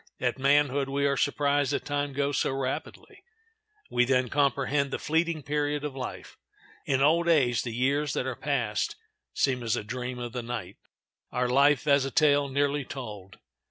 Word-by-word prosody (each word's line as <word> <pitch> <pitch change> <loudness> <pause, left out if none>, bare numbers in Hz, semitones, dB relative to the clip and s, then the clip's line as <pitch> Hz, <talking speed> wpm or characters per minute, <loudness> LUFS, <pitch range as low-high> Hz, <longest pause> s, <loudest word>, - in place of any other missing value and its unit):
At - - -1
manhood 140 0 +2
we 140 +1 0
are 140 0 +2
surprised 145 0 +1
that - - -2
time 145 0 -1
goes 140 0 0
so - - 0
rapidly; 135 -1 -5 0.7
we 125 - +3
then 125 -1 +1
comprehend 140 0 +1
the - - -3
fleeting 160 0 0
period 145 +1 -1
of 145 -3 -4
life. 130 -2 -7 0.5
In 135 -1 +2
old 170 +4 +3
age 125 -8 +3
the 120 - -5
years 135 +4 0
that - - -1
are 130 -2 -3
passed 125 -8 -1 0.4
seem 130 -2 +1
as 115 -2 0
a - - -3
dream 125 +3 -5
of 120 -1 -6
the 125 - -3
night, 120 -5 -6 0.5
our 125 0 0
life 140 +3 +3
as 140 -2 +4
a 135 - -2
tale 145 0 +3
nearly 140 +1 0
told. 105 -8 -8
140 Hz, 175 wpm, -27 LUFS, 125-145 Hz, 0.7 s, as